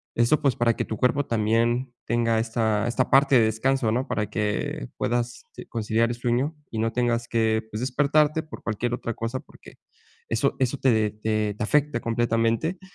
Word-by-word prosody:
Eso, 120 +6 +3
pues, 140 -4 +2
para 115 -1 +2
que - - -1
tu 110 - -5
cuerpo 135 +4 +1
también 115 +3 +1
tenga 115 -1 +1
esta 110 -1 0
esta 125 +2 0
parte 135 0 +5
de 110 - +4
descanso, 115 +2 +1
¿no?, 125 +5 -1
para 105 -1 -1
que 105 - -2
puedas, 120 0 -2
sí, - - -10
conciliar 115 +1 0
el 120 - -2
sueño 120 +6 -1 0.2
y 110 - -3
no 115 +1 0
tengas 120 -1 0
que, 110 -1 +1
pues, 105 - -4
despertarte 150 +4 +2
por 155 - -11
cualquier 115 +2 -2
otra 115 - -4
cosa, 115 +3 -3
porque - - -16 0.5
eso 115 +5 +1
eso 130 +2 0
te 110 -5 +2
te 110 -1 -1
te 105 - -4
afecta 145 +2 +1
completamente. 115 +8 0
115 Hz, 180 wpm, -25 LUFS, 110-130 Hz, 0.5 s, parte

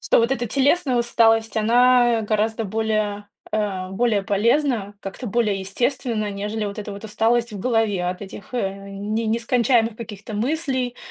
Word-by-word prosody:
Что - - +3
вот 235 +3 +2
эта 240 -2 -1
телесная 275 +1 +2
усталость, 225 -1 +2
она, 240 +1 +4
э, - - -4
гораздо 220 +1 0
более, 210 -1 -1 0.2
э, - - +1
а, 190 -3 -2
более 210 0 +1
полезна, 220 +1 +1
как-то 195 +6 -7
более 210 -2 0
естественна, 230 +1 -1
нежели 210 +2 -3
вот 200 +1 -5
эта 205 -1 -5
вот 200 +2 -9
усталость 225 +2 +1
в 205 - -6
голове 220 -6 +1
от 180 +2 -3
этих, 200 +3 -10
э, 195 -5 0 0.2
не 210 +3 -3
нескончаемых 230 0 +2
каких-то 215 -2 -8
мыслей, 260 0 -1
220 Hz, 160 wpm, -22 LUFS, 205-240 Hz, 0.2 s, она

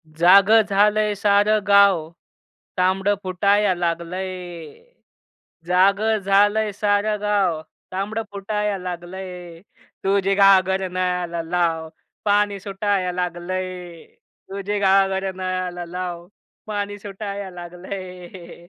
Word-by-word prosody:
"जागं 190 +7 +6
झालंय 210 +1 +3
सारं 205 +1 +3
गाव 200 -5 +5 0.7
तांबडं 190 +2 +2
फुटाया 200 +2 +2
लागलंय, 175 -1 -4 0.9
जागं 200 +5 +3
झालंय 205 +2 +2
सारं 205 +1 0
गाव 200 -6 +1 0.3
तांबडं 205 +4 -2
फुटाया 205 0 -2
लागलंय. 180 -1 -7 0.4
तुझी 195 0 +2
घागर 190 -1 +4
नळाला 180 -2 -2
लाव 165 -1 -1 0.4
पाणी 205 -1 +2
सुटाया 195 -2 -1
लागलंय, 180 0 -5 0.5
तुझी 200 +1 -3
घागर 195 -1 +2
नळाला 185 -1 -3
लाव 175 -1 -6 0.4
पाणी 205 -1 -4
सुटाया 200 -1 -6
लागलंय." 180 0 -9
190 Hz, 90 wpm, -22 LUFS, 180-205 Hz, 0.9 s, जागं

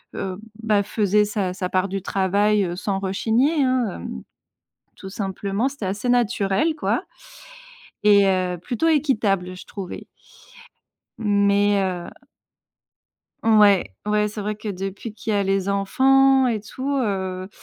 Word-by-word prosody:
heu, 185 -1 -4 0.3
bah 210 -2 +3
faisait 210 0 +2
sa 205 -3 -2
sa 185 -1 -3
part 185 +1 0
du 195 0 -3
travail, 200 +2 +1
heu, 175 -1 -4
sans 195 0 -2
rechigner, 230 - +1
hein, 255 -2 +1 0.2
hem, 65 -5 -7 0.7
tout 190 - -9
simplement. 200 +4 -2
C'était 270 -8 -7
assez 205 +6 -2
naturel 235 +3 +1
quoi 300 - -1 1.0
et 205 -1 +5
heu, 185 -2 0
plutôt 240 - -2
équitable 210 - +1
je - - -11
trouvais. 195 -3 -8 1.1
Mais 205 -1 +2
heu 180 -2 -3 1.4
Ouais, 210 - +4
ouais, 210 0 +1
c'est 210 0 -6
vrai 210 +1 -2
que 215 +1 -8
depuis 195 +3 -5
qu'il 220 0 -4
y - - +2
a 200 - +2
les 195 0 0
enfants 265 +7 +4
et 225 -4 0
tout, 260 +7 -4
heu, 190 -5 -2
205 Hz, 140 wpm, -22 LUFS, 190-225 Hz, 1.4 s, et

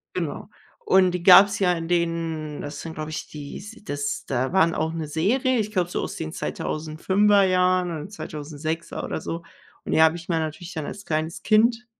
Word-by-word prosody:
Genau, - - -4 0.4
und 190 - +4
die 180 -1 -3
gab's 190 +3 +7
ja 180 -2 +4
in 165 -1 -4
den 165 -3 -1
das 145 0 -6
sind, 165 -1 -7
glaube 155 0 -5
ich, 155 - -5
dies 175 +10 -9
das 145 -5 -3
da 130 +1 -1
waren 170 -3 +3
auch 160 +1 -1
'ne 165 -2 -4
Serie, 235 - +1
ich 210 0 -2
glaube, 180 -4 0
so - - -3
aus - - -5
den 160 -1 -5
2005er 190 +8 +1
Jahren 185 -1 +2
oder 155 +2 -6
2006er 155 -3 -5
oder - - -3
so 165 0 -5 0.4
und - - -4
die 160 - +5
habe 160 +1 +5
ich 165 -1 -11
mir 165 -2 +1
natürlich 160 +3 -5
dann 155 -3 -4
als 205 - -8
kleines 155 +1 -2
Kind 230 +2 +3
165 Hz, 195 wpm, -24 LUFS, 155-190 Hz, 0.4 s, gab's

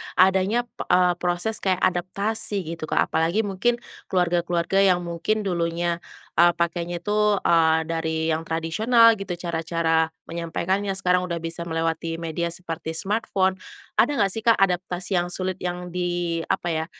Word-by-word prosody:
adanya, 190 +5 +3
p 245 - -33
eee, 180 0 +4
proses 180 +5 -1
kayak 185 -2 0
adaptasi 195 +3 0
gitu, 165 -2 -6
Kak. - - +1
Apalagi 165 +7 +1
mungkin 235 +5 0 0.2
keluarga-keluarga 175 0 +1
yang 185 -3 +4
mungkin 175 +6 -1
dulunya, 170 -2 -1 0.4
eee, 175 0 +6
pakainya 170 0 -2
tuh, 210 0 +2
eee, 160 -1 +4
dari 160 0 -1
yang 160 +1 -2
tradisional 220 +9 +4
gitu. 195 -3 -4
Cara-cara 165 -1 0 0.2
menyampaikannya 185 +4 -2
sekarang 180 -1 +1
udah 170 - -2
bisa 165 +1 -4
melewati 165 0 -2
media 165 +1 -3
seperti 165 -1 -5
smartphone. 190 -1 0 0.4
Ada 290 - +4
enggak 200 -6 +2
sih, 225 - -3
Kak, 230 +1 +4
adaptasi 180 -1 0
yang 175 - -1
sulit, 185 +1 -3
yang 180 0 -4
di 175 -1 -1
apa 175 - -1
ya, 160 0 -1
175 Hz, 150 wpm, -24 LUFS, 165-190 Hz, 0.4 s, eee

